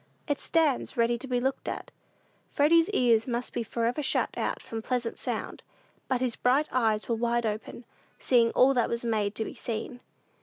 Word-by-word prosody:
It 290 Hz, -2 st, 0 dB
stands 305 Hz, -5 st, 0 dB
ready 235 Hz, 0 st, +2 dB
to 270 Hz, -, -7 dB
be 250 Hz, -1 st, 0 dB
looked 265 Hz, +2 st, -2 dB
at. -, -, -6 dB, 0.6 s
Freddy's 330 Hz, +4 st, +4 dB
ears 235 Hz, -, +3 dB
must 240 Hz, 0 st, -3 dB
be 240 Hz, -, -1 dB
forever 235 Hz, +4 st, -1 dB
shut 280 Hz, -, 0 dB
out -, -, -2 dB
from 225 Hz, -1 st, -6 dB
pleasant 240 Hz, 0 st, -2 dB
sound; -, -, -4 dB, 0.5 s
but 255 Hz, -2 st, 0 dB
his 250 Hz, -3 st, 0 dB
bright 270 Hz, +5 st, +2 dB
eyes 220 Hz, -4 st, +1 dB
were 235 Hz, -, 0 dB
wide 235 Hz, +1 st, 0 dB
open, 215 Hz, +2 st, -4 dB, 0.3 s
seeing 235 Hz, -3 st, +3 dB
all 270 Hz, +2 st, +5 dB
that 245 Hz, -3 st, +1 dB
was 235 Hz, 0 st, -2 dB
made 215 Hz, -2 st, 0 dB
to 220 Hz, -, -2 dB
be -, -, -6 dB
seen. 240 Hz, +2 st, -5 dB
240 Hz, 185 wpm, -28 LUFS, 230-260 Hz, 0.6 s, all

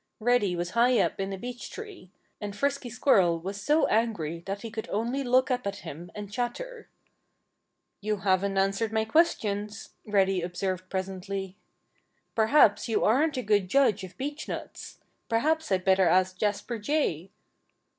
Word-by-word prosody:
Reddy 225 Hz, -5 st, +2 dB
was 175 Hz, 0 st, -3 dB
high 240 Hz, +3 st, +4 dB
up 195 Hz, -, 0 dB
in 195 Hz, 0 st, -2 dB
a 195 Hz, -, -4 dB
beech 245 Hz, +4 st, -7 dB
tree. 410 Hz, -, -10 dB, 0.3 s
And 205 Hz, -1 st, -5 dB
Frisky 280 Hz, +1 st, -1 dB
Squirrel 195 Hz, -8 st, +3 dB
was 195 Hz, +4 st, -6 dB
so 300 Hz, +2 st, +3 dB
angry 205 Hz, -8 st, 0 dB
that 200 Hz, +1 st, -3 dB
he 230 Hz, -, -6 dB
could 220 Hz, -1 st, -6 dB
only 240 Hz, +6 st, -1 dB
look 255 Hz, +1 st, +3 dB
up 250 Hz, -4 st, -1 dB
at 200 Hz, -, -2 dB
him 165 Hz, +2 st, -8 dB
and 205 Hz, -1 st, -7 dB
chatter. 440 Hz, -, -4 dB, 1.1 s
"You 210 Hz, 0 st, -1 dB
haven't 195 Hz, 0 st, +1 dB
answered 195 Hz, +3 st, +1 dB
my 220 Hz, 0 st, +1 dB
questions," 215 Hz, -7 st, 0 dB, 0.2 s
Reddy 195 Hz, -3 st, +2 dB
observed 185 Hz, +1 st, -3 dB
presently. 190 Hz, 0 st, -4 dB, 0.8 s
"Perhaps 225 Hz, -1 st, +4 dB
you 225 Hz, -, +1 dB
aren't 280 Hz, +6 st, +3 dB
a 255 Hz, -, -1 dB
good 205 Hz, -3 st, +2 dB
judge 215 Hz, -6 st, +3 dB
of 185 Hz, 0 st, -10 dB
beechnuts. 290 Hz, +3 st, -6 dB, 0.3 s
Perhaps 310 Hz, +5 st, +1 dB
I'd 185 Hz, -1 st, +1 dB
better 190 Hz, -1 st, +4 dB
ask 185 Hz, +2 st, +3 dB
Jasper 210 Hz, +4 st, -2 dB
Jay." 205 Hz, -, -1 dB
210 Hz, 155 wpm, -28 LUFS, 190-245 Hz, 1.1 s, high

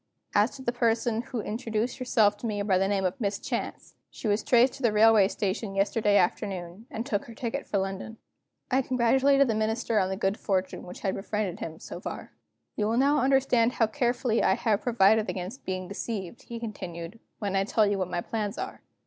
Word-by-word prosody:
As 210 Hz, +3 st, +4 dB
to 265 Hz, -, -9 dB
the 240 Hz, -, 0 dB
person 235 Hz, -1 st, +1 dB
who 240 Hz, -1 st, -4 dB
introduced 225 Hz, +2 st, -2 dB
herself 220 Hz, -5 st, +3 dB
to 230 Hz, -, -4 dB
me 210 Hz, -2 st, -2 dB
by 190 Hz, -3 st, +2 dB
the 195 Hz, -, +2 dB
name 195 Hz, -1 st, 0 dB
of 185 Hz, +8 st, -2 dB
Miss 200 Hz, -1 st, 0 dB
Chance, -, -, -5 dB, 0.2 s
she -, -, -6 dB
was 205 Hz, +1 st, +2 dB
traced 245 Hz, +3 st, +4 dB
to -, -, -11 dB
the 235 Hz, -4 st, +3 dB
railway 215 Hz, -1 st, +6 dB
station 195 Hz, 0 st, -3 dB
yesterday 205 Hz, +1 st, +2 dB
afternoon, 185 Hz, +2 st, -1 dB
and 230 Hz, -5 st, -4 dB
took 205 Hz, -7 st, -1 dB
her 230 Hz, -, -11 dB
ticket 235 Hz, -1 st, -4 dB
for 205 Hz, -, 0 dB
London." 195 Hz, +3 st, -4 dB, 0.5 s
I 260 Hz, +1 st, +4 dB
congratulated 265 Hz, +3 st, +3 dB
the 225 Hz, -, +1 dB
Minister 220 Hz, +1 st, 0 dB
on 185 Hz, -, +1 dB
the 190 Hz, -, -3 dB
good 195 Hz, +1 st, 0 dB
fortune 185 Hz, -2 st, -2 dB
which 180 Hz, -, -9 dB
had 190 Hz, -, 0 dB
befriended 205 Hz, -2 st, -3 dB
him, 160 Hz, -1 st, -6 dB
so -, -, -8 dB
far. -, -, -7 dB, 0.4 s
"You 210 Hz, -, 0 dB
will 230 Hz, +2 st, +1 dB
understand 270 Hz, -4 st, +3 dB
how 225 Hz, -, +3 dB
carefully 240 Hz, -1 st, 0 dB
I -, -, +3 dB
have 215 Hz, -4 st, +1 dB
provided 220 Hz, -2 st, +3 dB
against 190 Hz, +7 st, -5 dB
being 185 Hz, -1 st, -3 dB
deceived," 200 Hz, 0 st, -5 dB
he 235 Hz, -1 st, -5 dB
continued, 185 Hz, -3 st, -7 dB, 0.2 s
"when 200 Hz, -2 st, -2 dB
I 195 Hz, -, +3 dB
tell 215 Hz, +2 st, +2 dB
you 200 Hz, -1 st, 0 dB
what 185 Hz, -1 st, -1 dB
my 175 Hz, -, -2 dB
plans 210 Hz, -1 st, -3 dB
are. -, -, -5 dB
215 Hz, 205 wpm, -27 LUFS, 195-235 Hz, 0.5 s, railway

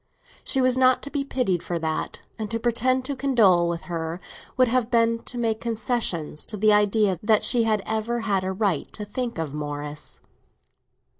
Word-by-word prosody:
She 265 Hz, -, +3 dB
was 255 Hz, 0 st, +2 dB
not 255 Hz, 0 st, +4 dB
to 285 Hz, -, -7 dB
be 285 Hz, -1 st, -1 dB
pitied 245 Hz, -11 st, -1 dB
for 175 Hz, -1 st, -3 dB
that, 160 Hz, -1 st, -3 dB, 0.2 s
and 215 Hz, -1 st, -4 dB
to 230 Hz, -, -2 dB
pretend 255 Hz, +2 st, +1 dB
to 280 Hz, -, -3 dB
condole 210 Hz, -11 st, +3 dB
with 170 Hz, -1 st, -4 dB
her 165 Hz, 0 st, -4 dB, 0.4 s
would 255 Hz, -1 st, +5 dB
have 240 Hz, -1 st, +1 dB
been 230 Hz, -1 st, +2 dB
to 245 Hz, -, -4 dB
make 225 Hz, -2 st, -1 dB
concessions 220 Hz, -9 st, -1 dB
to 215 Hz, -, -5 dB
the 215 Hz, +1 st, +4 dB
idea 210 Hz, -2 st, +2 dB
that 215 Hz, 0 st, +3 dB
she 240 Hz, -2 st, +3 dB
had 215 Hz, -3 st, +1 dB
ever 220 Hz, +2 st, -2 dB
had 200 Hz, -4 st, 0 dB
a 190 Hz, -, -2 dB
right 190 Hz, -5 st, -1 dB
to 210 Hz, -, -5 dB
think 235 Hz, +2 st, -4 dB
of 160 Hz, -4 st, -3 dB
Morris. 145 Hz, 0 st, -6 dB
220 Hz, 190 wpm, -24 LUFS, 180-240 Hz, 0.4 s, would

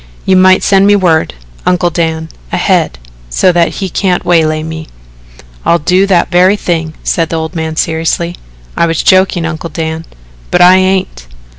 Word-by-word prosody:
You 190 Hz, -, +3 dB
might 185 Hz, 0 st, +4 dB
send 195 Hz, 0 st, +3 dB
me 205 Hz, -, +5 dB
word, 165 Hz, -, +1 dB, 0.3 s
Uncle 180 Hz, -1 st, +1 dB
Dan, 160 Hz, -1 st, -2 dB, 0.2 s
ahead, 65 Hz, -, 0 dB, 0.3 s
so 180 Hz, -, +2 dB
that 170 Hz, -1 st, +2 dB
he 195 Hz, -, -3 dB
can't 185 Hz, 0 st, -1 dB
waylay 155 Hz, -2 st, +1 dB
me." 160 Hz, 0 st, -7 dB, 0.8 s
"I'll 170 Hz, -, +2 dB
do 180 Hz, +5 st, +1 dB
that 185 Hz, -2 st, +1 dB
very 185 Hz, +3 st, +4 dB
thing," 165 Hz, -5 st, -3 dB
said 165 Hz, -2 st, -1 dB
the -, -, -3 dB
old 160 Hz, +1 st, -4 dB
man 160 Hz, -2 st, -4 dB
seriously. 165 Hz, +2 st, -1 dB, 0.4 s
"I 170 Hz, -, +1 dB
was 165 Hz, -1 st, -1 dB
joking, 185 Hz, -2 st, +2 dB
Uncle 165 Hz, 0 st, -5 dB
Dan." 160 Hz, 0 st, -4 dB, 0.4 s
"But -, -, +1 dB
I 180 Hz, +1 st, +7 dB
ain't." 185 Hz, -, -1 dB
170 Hz, 165 wpm, -11 LUFS, 160-185 Hz, 0.8 s, I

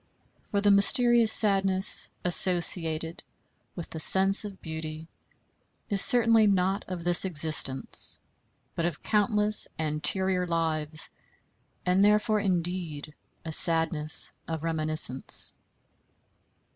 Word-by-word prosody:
For 200 Hz, -, -5 dB
the 205 Hz, 0 st, 0 dB
mysterious 235 Hz, +3 st, +3 dB
sadness 195 Hz, -2 st, +3 dB, 0.2 s
associated 170 Hz, -2 st, +3 dB, 0.5 s
with 175 Hz, -, -11 dB
the 160 Hz, -, -10 dB
sense 195 Hz, +5 st, +3 dB
of 200 Hz, -2 st, -12 dB
beauty 160 Hz, -1 st, -10 dB, 0.8 s
is 200 Hz, -1 st, +1 dB
certainly 230 Hz, -3 st, +2 dB
not 195 Hz, +1 st, -3 dB
of 180 Hz, -2 st, -9 dB
this 175 Hz, 0 st, +4 dB
existence, 155 Hz, -6 st, 0 dB, 0.6 s
but 170 Hz, -, -6 dB
of 170 Hz, -3 st, -7 dB
countless 210 Hz, 0 st, -3 dB
anterior 180 Hz, +4 st, -4 dB
lives, 155 Hz, -2 st, -5 dB, 0.7 s
and 185 Hz, +2 st, -1 dB
therefore 210 Hz, +1 st, -1 dB
indeed 175 Hz, -6 st, -6 dB, 0.3 s
a 160 Hz, -, -8 dB
sadness 160 Hz, -3 st, +2 dB, 0.2 s
of 160 Hz, -1 st, -8 dB
reminiscence. 155 Hz, -5 st, +2 dB
180 Hz, 100 wpm, -24 LUFS, 160-200 Hz, 0.8 s, this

